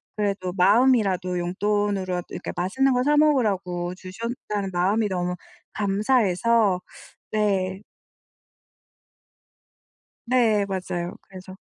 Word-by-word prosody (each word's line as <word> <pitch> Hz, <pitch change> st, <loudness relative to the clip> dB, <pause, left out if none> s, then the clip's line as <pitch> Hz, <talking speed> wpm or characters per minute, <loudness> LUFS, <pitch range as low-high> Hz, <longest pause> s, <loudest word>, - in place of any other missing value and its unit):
그래도 200 Hz, -3 st, -2 dB
마음이라도 195 Hz, -4 st, +3 dB
용돈으로라도 190 Hz, 0 st, -1 dB
이렇게 -, -, -5 dB
맛있는 260 Hz, +10 st, +1 dB
거 250 Hz, 0 st, +1 dB
사 295 Hz, +1 st, +3 dB
먹으라고 195 Hz, -12 st, +1 dB
주셨다는 205 Hz, 0 st, -5 dB
마음이 200 Hz, +5 st, +1 dB
너무 180 Hz, -1 st, -2 dB, 0.4 s
감사해서 205 Hz, -1 st, +2 dB, 0.5 s
네. 195 Hz, -3 st, 0 dB, 2.5 s
네 230 Hz, -5 st, +3 dB
맞아요. 180 Hz, -2 st, -4 dB
그래서 185 Hz, 0 st, -12 dB
195 Hz, 240 characters per minute, -24 LUFS, 185-225 Hz, 2.5 s, 마음이라도